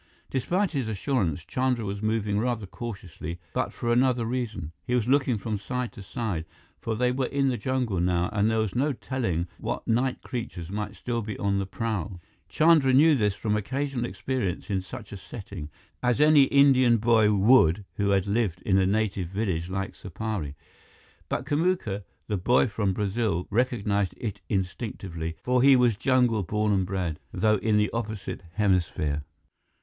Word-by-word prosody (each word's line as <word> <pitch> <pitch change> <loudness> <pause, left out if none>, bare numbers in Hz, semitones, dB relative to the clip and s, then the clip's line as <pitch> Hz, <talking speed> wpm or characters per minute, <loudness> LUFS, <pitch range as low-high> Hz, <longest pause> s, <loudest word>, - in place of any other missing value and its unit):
Despite 180 +9 0
his 135 -7 -2
assurance, 95 - -1
Chandra 125 -3 0
was 100 0 -4
moving 110 -2 0
rather 115 -2 -1
cautiously, 90 -6 -7
but 130 - -1
for 120 -1 -1
another 125 -1 +2
reason. 110 -9 -3
He 125 0 -1
was 120 -2 +1
looking 130 -3 +3
from 105 0 -3
side 125 +3 -3
to 105 - -11
side, 95 -5 -3 0.3
for 115 - -2
they 125 +2 +2
were 130 0 -1
in 140 -1 +1
the 125 - 0
jungle 125 -4 -1
now 90 0 +1
and 105 0 +2
there 110 - +1
was 110 -3 0
no 140 +4 +1
telling 115 -10 -2
what - - -4
night 125 +3 +1
creatures 105 -8 -5
might 105 0 -4
still 120 -1 -2
be 105 -1 -5
on 100 -1 0
the 95 - -2
prowl. 100 -4 -3 0.3
Chandra 155 -5 +4
knew 155 +4 +6
this 105 -7 +1
from 105 -1 -1
occasional 130 +3 -2
experience 120 -8 -3
in 95 -1 +1
such 95 - -9
a 100 - -6
setting, 95 -6 -8 0.3
as 125 0 +1
any 150 -2 +7
Indian 130 -4 +5
boy 110 -1 +4
would 100 -3 +4
who 100 -1 +1
had 100 -1 +2
lived 100 -4 -1
in 95 -1 +3
a 95 - +3
native 100 -3 0
village 90 -3 -2
like 95 0 -3
Supari. 95 -6 -5 0.7
But 125 - -2
Kamuka, 145 - 0 0.2
the 105 - -1
boy 120 +8 +3
from 105 -4 -1
Brazil, 105 -3 -1
recognized 105 -4 0
it 110 -5 -5
instinctively, 90 -4 -3
for 125 0 +2
he 135 +1 +7
was 125 -3 +4
jungle 125 -1 +2
born 105 +3 0
and 95 -2 +1
bred, 90 -5 -2
though 110 +3 +2
in 105 +1 +1
the 105 0 +2
opposite 110 -5 -4
hemisphere. 85 -7 +1
110 Hz, 170 wpm, -27 LUFS, 95-125 Hz, 0.7 s, any